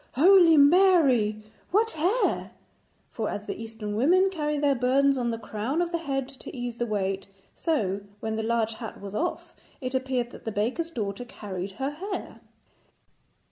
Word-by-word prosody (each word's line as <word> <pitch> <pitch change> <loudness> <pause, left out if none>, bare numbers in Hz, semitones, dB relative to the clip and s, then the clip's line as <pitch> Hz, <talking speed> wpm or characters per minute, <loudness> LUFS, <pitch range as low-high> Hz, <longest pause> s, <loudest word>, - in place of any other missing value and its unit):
Holy 340 +2 +7
Mary, 285 - +5 0.3
what 445 +4 +2
hair!' 360 +10 0 0.6
For 220 -2 -2
as 205 - -5
the - - -5
Eastern 220 -2 -5
women 365 - +4
carry 300 -4 -1
their 285 -1 +3
burdens 270 +2 +3
on 245 -2 -1
the 230 - -2
crown 225 +7 -3
of 345 -1 0
the 340 - -1
head 270 -4 -2
to - - -8
ease 245 -1 -4
the 240 - -1
weight, 195 -2 -2 0.3
so, 205 - -1 0.2
when 220 0 -3
the 220 - -1
large 225 0 0
hat 225 0 -8
was 200 0 -8
off, 345 +11 -3 0.3
it 255 -1 -4
appeared 260 -2 -1
that - - -12
the 225 - -3
baker's 240 +11 -1
daughter 210 -6 -4
carried 195 -5 -6
her 270 +6 -3
hair. 385 +7 -6
250 Hz, 170 wpm, -27 LUFS, 220-315 Hz, 0.6 s, Holy